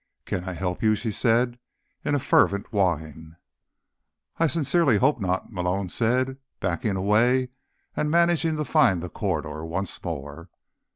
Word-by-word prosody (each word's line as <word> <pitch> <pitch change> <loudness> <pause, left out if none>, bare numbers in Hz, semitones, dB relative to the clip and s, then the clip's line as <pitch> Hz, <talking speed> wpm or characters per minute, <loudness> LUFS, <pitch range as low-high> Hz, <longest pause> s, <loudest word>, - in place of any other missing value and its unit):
"Can 90 - -3
I 95 - -4
help 90 0 -3
you?" 110 -1 +3
she 110 +1 -3
said 120 +3 +1 0.4
in 145 - 0
a - - +1
fervent 100 -5 +2
whine. 80 -4 -1 1.0
"I 165 - +4
sincerely 145 -4 +3
hope 135 +3 +2
not," 95 0 -2
Malone 90 +1 -1
said, 130 +6 0 0.2
backing 95 +4 -1
away 115 +7 +2 0.5
and 150 - 0
managing 165 -1 +2
to 150 - -2
find 95 - +3
the 90 - -5
corridor 80 0 -3
once 85 +4 -3
more. 80 +1 -6
105 Hz, 140 wpm, -25 LUFS, 90-130 Hz, 1.0 s, I